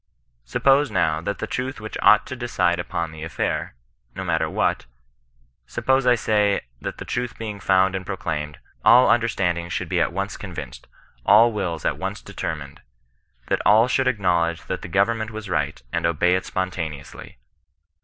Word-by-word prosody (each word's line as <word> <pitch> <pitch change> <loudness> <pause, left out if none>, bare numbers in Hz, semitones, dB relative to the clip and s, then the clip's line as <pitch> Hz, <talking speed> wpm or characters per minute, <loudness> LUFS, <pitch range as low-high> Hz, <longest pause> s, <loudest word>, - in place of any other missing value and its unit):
Suppose 135 - +3
now 80 -7 +1
that 100 +4 -3
the - - -3
truth 130 +1 -4
which 110 0 -7
ought 110 0 +6
to 130 - -6
decide 115 -8 0
upon 85 -1 -3
the 80 0 -10
affair 80 -5 -3 0.4
(no - - -4
matter - - 0
what) - - +1
j - - -18 0.8
sup 120 - -6
pose, 130 -1 +3
I 125 - +6
say, 105 -3 +1 0.2
that - - -5
the - - -7
truth 120 0 -3
being 105 -3 -5
found 95 0 +3
and 95 -1 -3
proclaimed, 80 -6 -4 0.3
all 125 +1 +7
understandings 90 -8 0
should 90 0 -3
be 90 -2 +1
at 85 - +1
once 100 +3 -3
convinced; 75 -10 -8 0.4
all 110 - +6
wills 85 -7 -3
at - - 0
once - - -4
determined; 70 -3 -6 0.6
that - - 0
all 110 +4 +5
should 130 +1 +1
acknowledge 90 -8 +1
that - - -4
the - - -7
government 110 +5 +1
was 110 -3 -7
right, 75 -2 -1
and - - +1
obey 85 +2 +2
it 95 0 -1
spontaneously. 85 -6 -5
95 Hz, 175 wpm, -23 LUFS, 85-115 Hz, 0.8 s, all